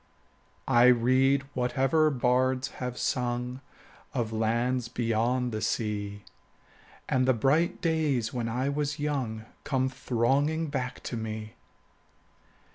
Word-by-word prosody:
I 120 +1 +5
read 130 +3 +4
whatever 135 +5 +2
bards 130 0 +1
have 125 -1 -3
sung 125 +1 -2 0.5
Of 115 -3 -1
lands 115 +3 0
beyond 120 +1 0
the 110 -1 -3
sea, 105 -2 -2 0.8
10 130 - +1
And 130 - +2
the 130 - +4
bright 145 +9 +1
days 155 -8 0
when 120 -2 -2
I 125 +4 -1
was 145 +1 -1
young 130 -7 -2 0.2
Come 130 -1 0
thronging 140 +6 0
back 125 -3 -3
to - - -4
me. 110 -1 -5
125 Hz, 120 wpm, -28 LUFS, 115-135 Hz, 0.8 s, I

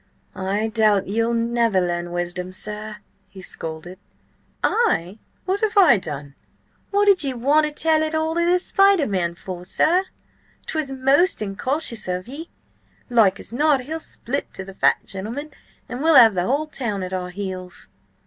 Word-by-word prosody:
"I 200 +3 -1
doubt 215 -3 +2
ye'll 230 +3 0
never 230 -3 +1
learn 175 -1 -2
wisdom, 175 +1 -3
sir," 210 +2 -6 0.3
he 195 - -13
scolded. 165 +2 -7 0.6
"I? 215 - +1 0.3
What 380 +2 0
have 435 -1 0
I 350 - +7
done?" 145 -4 -6 0.6
"What 405 0 +2
did 395 -5 +4
ye 270 -2 -2
want 290 +6 +3
to - - -5
tell 315 +1 +2
it 315 0 -1
all 315 0 0
to 340 +1 +1
the 350 +1 +4
spider 390 -2 +3
man 175 -5 -1
for, 180 0 -8
sir? 345 - +2 0.6
'Twas 310 -3 -2
most 270 +7 +2
incautious 230 +4 -3
of 180 +3 -3
ye. 305 +6 -8 0.6
Like 215 -5 +4
as - - -11
not, 290 +1 +3
he'll 315 +6 -5
split 280 -3 -5
to 190 - -6
the 195 0 -10
fat - - +2
gentleman, 230 +11 -6 0.4
and 245 +2 -6
we'll 320 0 +4
have 230 -5 +8
the 180 -1 -1
whole 285 +4 +1
town 230 -10 -3
at 185 0 -5
our 180 -1 -3
heels." 185 -1 -6
230 Hz, 170 wpm, -22 LUFS, 190-310 Hz, 0.6 s, have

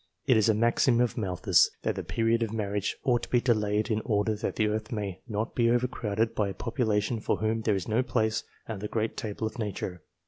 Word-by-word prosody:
It 130 -4 +4
is 110 0 +4
a 110 - +4
maxim 115 +2 +3
of 120 -1 +1
Malthus 95 -7 +3
that - - +1
the - - -3
period 115 +1 +1
of 115 -2 -1
marriage 105 -2 -2
ought 120 -2 +2
to - - -7
be 125 - +4
delayed 105 -2 +1
in 110 0 +1
order 105 0 +1
that 105 - -3
the 110 - +2
earth 105 0 -2
may 100 -5 -3
not 110 0 -2
be 115 -1 +3
overcrowded 115 -3 0
by 105 -2 0
a 95 - -6
population 115 -1 0
for - - 0
whom 110 +1 0
there 110 -2 +1
is 95 - -3
no 110 +3 +2
place 110 -3 0 0.2
at 110 -3 -4
the 105 - -4
great 110 +1 -2
table 110 0 -4
of 110 +2 -5
nature. 95 -4 -4
110 Hz, 230 wpm, -28 LUFS, 105-115 Hz, 0.2 s, It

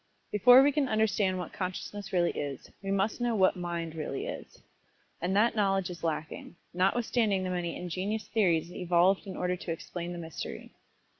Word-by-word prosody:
Before 245 +5 +8
we 290 - +4
can 280 -2 0
understand 210 -3 +1
what 180 -2 -6
Consciousness 195 +2 -5
really 175 -2 +2
is, 140 -3 -5
we 195 - -5
must 195 +4 0
know 240 -1 +1
just 215 - -1
what 185 - +4
"Mind" 170 -2 -4
really 155 -4 -4
is - - -8 0.6
and 180 +3 0
that 225 +3 +3
knowledge 195 -3 +1
is 170 -1 -10
lacking, 155 0 -4 0.2
notwithstanding 200 +1 +1
the 185 - -2
many 175 -2 -2
injenious 190 +5 -3
theories 175 -6 +1
evolved 180 +3 +2
in 190 - -6
order 180 0 0
to 175 -1 -6
explain 170 +1 -5
the 175 - -6
mystery. 165 -2 -7
185 Hz, 175 wpm, -30 LUFS, 175-210 Hz, 0.6 s, Before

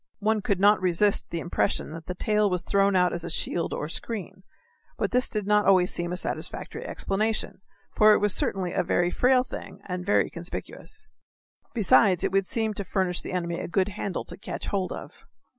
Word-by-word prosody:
One 215 0 +1
could 200 -3 0
not 205 +1 +5
resist 185 +3 +2
the 170 - -3
impression 175 +2 -1
that 160 0 -9
the 180 - -4
tail 210 +2 +2
was 180 -2 -1
thrown 195 +1 +2
out 180 -1 +3
as 170 - -4
a 170 - -5
shield 165 0 -1
or - - -3
a - - -7
screen, 195 -3 -4 0.6
but - - -1
this 250 +1 +1
did 210 -2 -3
not 210 -1 +3
always 185 -2 +4
seem 175 0 -3
a 180 - -2
satisfactory - - -4
explanation, 215 0 -2 0.3
for 215 0 +7
it - - +5
was 205 -1 +1
certainly 185 -2 -1
a - - +2
very 175 0 +1
frail 250 +3 +3
thing - - -8
and 180 -1 -4
very 200 +3 +2
conspicuous. 425 - -8 0.7
Besides, 195 -3 +4
it - - +1
would 195 -1 +1
seem 220 -3 -1
to 200 - -4
furnish 185 -2 -1
the - - -7
enemy 170 -2 -2
a - - -4
good 190 +3 +1
handle 200 -2 -4
to 175 - -9
catch 200 - -6
hold 195 -3 -1
of. - - -7
195 Hz, 205 wpm, -26 LUFS, 180-210 Hz, 0.7 s, for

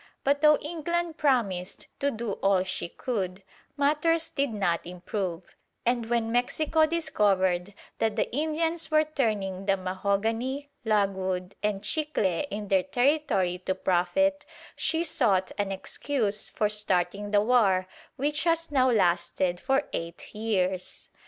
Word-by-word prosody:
But 285 +1 +2
though 300 -1 +6
England 340 +1 -2
promised 210 -11 0
to 280 - +2
do 230 -4 -4
all 195 -2 +3
she 185 -2 -3
could, 190 -4 -3 0.3
matters 310 +3 +2
did 280 0 0
not 190 -6 0
improve; 180 0 -5 0.3
and 240 -1 +1
when 230 -1 +1
Mexico 310 +6 +2
discovered 200 - +1 0.2
that 220 -2 +1
the - - +1
Indians 320 +2 0
were 310 0 +4
turning 210 -10 -2
the 195 0 +3
mahogany, 220 +9 -1
logwood, 190 -3 0
and 210 -1 -1
chicle 300 -1 0 0.2
in 205 0 -5
their 190 -1 +4
territory 245 - +1
to 190 +1 -2
profit, 190 +12 +1 0.3
she 325 0 0
sought 230 - +1
an 200 -1 0
excuse 210 +2 -1
for 210 - 0
starting 205 -1 0
the 205 0 +4
war 205 -5 +3 0.3
which 295 +4 0
has 330 -1 +1
now 260 -2 +4
lasted 175 -3 +1
for 270 +5 +1
eight 170 0 -6
years. 190 -4 -2
215 Hz, 135 wpm, -27 LUFS, 190-285 Hz, 0.3 s, though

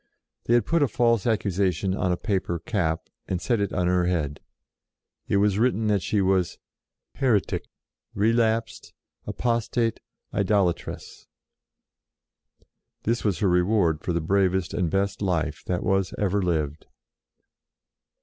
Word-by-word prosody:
They 120 - +3
had 120 - +3
put 170 -1 +1
a 145 - +4
false 120 -3 +2
accusation 95 -4 0
on 95 -2 0
a 90 - 0
paper 95 -4 -1
cap, 80 -3 -2 0.2
and 90 - -1
set 120 +2 0
it 100 - -1
on 90 -2 0
her 90 0 +2
head: 75 -5 -1 0.9
it - - +2
was 100 0 +2
written 115 -2 +2
that 100 -2 +2
she 105 +3 0
was 95 -2 +1 0.6
"Heretic, 115 -7 +1 0.5
Relapsed, 115 +1 0 0.3
Apostate, 115 -1 0 0.3
Idola 100 -3 +2
tress." - - -10 1.8
This 115 +2 0
was 100 -6 +1
her 100 - +3
reward 90 -3 +2
for 90 - -2
the 85 -1 0
bravest 95 +1 +1
and 90 -3 0
best 100 +2 -1
life 80 -6 -1
that 90 -1 -1
was 95 -1 0
ever 100 0 +1
lived. 80 -4 -2
95 Hz, 135 wpm, -25 LUFS, 90-110 Hz, 1.8 s, a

